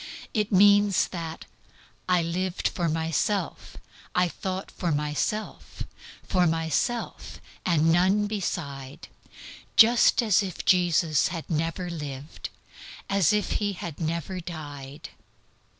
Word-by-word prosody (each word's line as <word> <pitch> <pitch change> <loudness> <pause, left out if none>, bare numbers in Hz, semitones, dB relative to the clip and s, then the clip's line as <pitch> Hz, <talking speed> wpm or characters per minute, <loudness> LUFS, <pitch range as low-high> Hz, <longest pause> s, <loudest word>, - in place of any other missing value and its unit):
It 210 0 0
means 205 0 +5
that 165 -2 -6 0.6
"I 180 -2 +3
lived 180 +2 -1
for 170 -2 -1
myself, 165 - -2 0.4
I 180 0 +3
thought 190 +2 -5
for 175 -3 -2
myself, 150 +8 -3 0.4
For 180 -2 +2
myself, 165 - -2 0.3
and 165 -2 +3
none 190 +5 +3
beside 155 -8 -5 0.7
Just 235 +1 +6
as 215 -3 +4
if 190 -4 -5
Jesus 170 -4 +3
had 170 -3 -5
never 165 +3 -1
lived, 145 -2 -7 0.6
As 195 -5 +4
if 210 -1 0
He 205 -1 0
had 170 -4 -7
never 170 +3 -3
died." 145 -5 -8
175 Hz, 110 wpm, -26 LUFS, 160-195 Hz, 0.7 s, Just